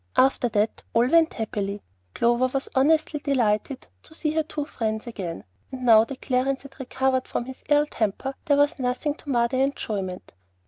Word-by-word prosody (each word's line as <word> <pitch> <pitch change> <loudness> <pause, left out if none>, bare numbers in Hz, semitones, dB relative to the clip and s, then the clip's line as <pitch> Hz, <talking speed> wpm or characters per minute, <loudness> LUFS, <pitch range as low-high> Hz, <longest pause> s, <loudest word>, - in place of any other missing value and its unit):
After 265 -1 +3
that 210 0 0
all 235 +2 +4
went 330 +1 +4
happily. 205 -2 -3 0.3
Clover 240 +2 +3
was 270 +1 -3
honestly 305 +3 +2
delighted 255 -2 0
to 315 - -13
see 310 -2 -1
her 315 +1 +1
two 300 -2 -4
friends 220 -5 -3
again. 190 -8 -6 0.3
And 255 -1 -6
now 225 -2 +7
that 270 +2 -9
Clarence 265 +1 0
had 275 - -14
recovered 265 0 0
from 240 - -3
his 260 0 -10
ill 295 0 +4
temper, 235 +1 -2
there 285 -2 +3
was 290 +1 +2
nothing 250 +3 -1
to 295 - -13
mar 240 -3 +3
their 260 +2 +1
enjoyment. 200 -9 -3
260 Hz, 180 wpm, -25 LUFS, 225-285 Hz, 0.3 s, now